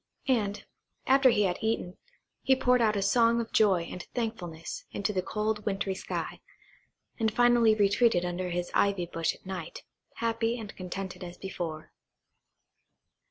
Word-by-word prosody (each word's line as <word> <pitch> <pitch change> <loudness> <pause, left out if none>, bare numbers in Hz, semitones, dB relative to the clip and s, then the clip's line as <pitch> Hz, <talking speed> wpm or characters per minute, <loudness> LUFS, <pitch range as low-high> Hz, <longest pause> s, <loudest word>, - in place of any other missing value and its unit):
And, 210 -6 0 0.4
after 270 0 +6
he 210 -3 +3
had 180 -2 0
eaten, 220 -5 -1 0.5
he 265 - +4
poured 250 -1 +3
out 215 -2 +3
a 200 - 0
song 230 +3 +4
of 230 - -4
joy 195 -5 +4
and 180 +2 -7
thankfulness 185 -9 -4
into 205 +1 -2
the 185 - +1
cold 210 +2 -2
wintry 195 -1 -1
sky, 190 - -5 0.8
and 220 -1 +2
finally 240 -1 +4
retreated 205 -2 +3
under 180 +1 -3
his 175 0 -3
ivy 200 -3 +2
bush 165 -1 -1
at - - -23
night, 190 - -6 0.3
happy 230 +1 -1
and 210 -3 -8
contented 185 0 -6
as 175 0 -8
before. 170 -5 -6
205 Hz, 150 wpm, -29 LUFS, 180-230 Hz, 0.8 s, after